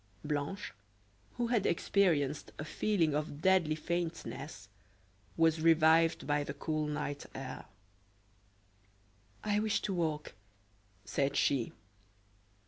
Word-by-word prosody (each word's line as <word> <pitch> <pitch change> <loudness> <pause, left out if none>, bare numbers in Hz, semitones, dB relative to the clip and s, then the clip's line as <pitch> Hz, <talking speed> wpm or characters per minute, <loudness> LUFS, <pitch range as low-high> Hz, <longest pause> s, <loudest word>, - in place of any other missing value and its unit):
Blanche, 150 - -3 0.6
who 240 - +1
had 225 -5 +2
experienced 165 -6 +1
a 145 - -5
feeling 170 -3 +1
of 150 -1 -2
deadly 185 -5 +4
faintness, 160 - -4 0.7
was 165 -1 +3
revived 165 0 +5
by 145 0 +1
the 140 0 -6
cool 155 +1 -1
night 145 -1 -3
air. 135 -1 -6 1.8
"I 210 0 +1
wish 215 -1 +1
to 195 - -1
walk," 160 -4 -2 0.7
said 135 +7 0
she. 135 -5 +2
155 Hz, 105 wpm, -33 LUFS, 145-175 Hz, 1.8 s, revived